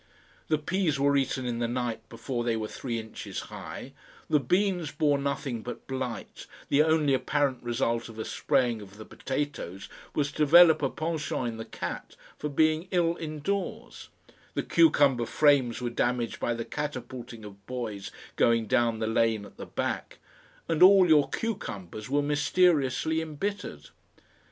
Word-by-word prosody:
The 155 Hz, -, +2 dB
peas 155 Hz, -1 st, 0 dB
were 140 Hz, +1 st, +3 dB
eaten 135 Hz, -1 st, 0 dB
in 120 Hz, -1 st, -2 dB
the 120 Hz, -, 0 dB
night 120 Hz, -1 st, -2 dB
before 120 Hz, +1 st, -4 dB
they 120 Hz, -1 st, 0 dB
were 110 Hz, -1 st, -3 dB
three 120 Hz, +1 st, -4 dB
inches 110 Hz, -1 st, -7 dB
high, -, -, -8 dB, 0.4 s
the 150 Hz, -, +5 dB
beans 180 Hz, +3 st, +1 dB
bore 150 Hz, -2 st, +2 dB
nothing 140 Hz, -4 st, -2 dB
but 120 Hz, +2 st, -7 dB
blight, 130 Hz, -4 st, -5 dB, 0.2 s
the 140 Hz, -, +4 dB
only 155 Hz, -2 st, +3 dB
apparent 140 Hz, 0 st, 0 dB
result 120 Hz, -1 st, -1 dB
of 115 Hz, -, -11 dB
a 110 Hz, -, -4 dB
spraying 125 Hz, -5 st, 0 dB
of 100 Hz, 0 st, -13 dB
the 110 Hz, -, -9 dB
potatoes 130 Hz, -9 st, -4 dB, 0.3 s
was 145 Hz, -1 st, 0 dB
to -, -, -12 dB
develop 160 Hz, +2 st, +7 dB
a 135 Hz, -, +1 dB
PENCHANT 155 Hz, -4 st, -2 dB
in 115 Hz, -, -7 dB
the 110 Hz, -, -6 dB
cat -, -, -6 dB, 0.2 s
for 150 Hz, -, -3 dB
being 155 Hz, +3 st, +2 dB
ill 170 Hz, -2 st, +2 dB
indoors, 165 Hz, +5 st, -4 dB, 0.5 s
the -, -, 0 dB
cucumber 140 Hz, -, +4 dB
frames 140 Hz, -6 st, +3 dB
were 120 Hz, -, -1 dB
damaged 120 Hz, -1 st, -1 dB
by 120 Hz, -, 0 dB
the 115 Hz, 0 st, -4 dB
catapulting 125 Hz, -5 st, -6 dB
of 100 Hz, -1 st, -13 dB
boys 115 Hz, -6 st, -5 dB, 0.3 s
going 115 Hz, -1 st, +3 dB
down 120 Hz, 0 st, +2 dB
the 110 Hz, -, -2 dB
lane 110 Hz, -1 st, +1 dB
at -, -, -15 dB
the -, -, -8 dB
back, -, -, -3 dB, 0.5 s
and 165 Hz, -2 st, -1 dB
all 190 Hz, 0 st, +8 dB
your 150 Hz, -3 st, +5 dB
cucumbers 110 Hz, -, -5 dB
were 145 Hz, +1 st, +2 dB
mysteriously 155 Hz, 0 st, +2 dB
embittered. 180 Hz, +6 st, -5 dB
135 Hz, 160 wpm, -28 LUFS, 115-155 Hz, 0.5 s, all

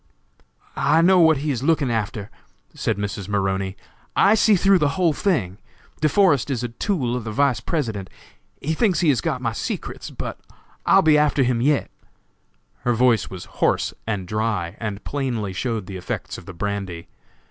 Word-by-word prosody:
"I 155 Hz, +4 st, +3 dB
know 185 Hz, +1 st, +6 dB
what 160 Hz, -3 st, +5 dB
he 150 Hz, -, +1 dB
is 125 Hz, -3 st, -2 dB
looking 145 Hz, -3 st, +2 dB
after," 105 Hz, -1 st, -3 dB, 0.4 s
said -, -, -1 dB
Mrs. 100 Hz, -1 st, -4 dB
Maroney; 95 Hz, -1 st, -1 dB, 0.4 s
"I 200 Hz, -, +5 dB
see 220 Hz, -1 st, +5 dB
through 195 Hz, +1 st, +4 dB
the 145 Hz, 0 st, 0 dB
whole 175 Hz, -4 st, +3 dB
thing! 110 Hz, -, -1 dB, 0.4 s
De 155 Hz, -, +2 dB
Forest 155 Hz, -, +3 dB
is 125 Hz, -3 st, -2 dB
a 120 Hz, -, -2 dB
tool 125 Hz, -, -1 dB
of 125 Hz, -, -3 dB
the 110 Hz, -, -5 dB
Vice 130 Hz, 0 st, +2 dB
President; 110 Hz, -, -3 dB, 0.5 s
he 155 Hz, +3 st, -2 dB
thinks 185 Hz, -1 st, +2 dB
he 170 Hz, -, +3 dB
has 130 Hz, -6 st, +2 dB
got 130 Hz, -, -2 dB
my 115 Hz, -, 0 dB
secrets, -, -, -5 dB
but -, -, -6 dB, 0.5 s
I'll -, -, +6 dB
be 155 Hz, -2 st, +5 dB
after 150 Hz, -2 st, +3 dB
him 120 Hz, -2 st, +1 dB
yet." 145 Hz, +2 st, +1 dB, 0.9 s
Her 120 Hz, -, 0 dB
voice 120 Hz, -2 st, +3 dB
was 95 Hz, -2 st, -8 dB
hoarse -, -, 0 dB
and 100 Hz, -5 st, -2 dB
dry, 105 Hz, -5 st, -2 dB
and 105 Hz, -2 st, -4 dB
plainly 120 Hz, -9 st, -2 dB
showed 110 Hz, 0 st, -2 dB
the 95 Hz, 0 st, -7 dB
effects 90 Hz, -, -5 dB
of -, -, -16 dB
the 95 Hz, -, -7 dB
brandy. 95 Hz, -2 st, -4 dB
120 Hz, 180 wpm, -22 LUFS, 100-150 Hz, 0.9 s, know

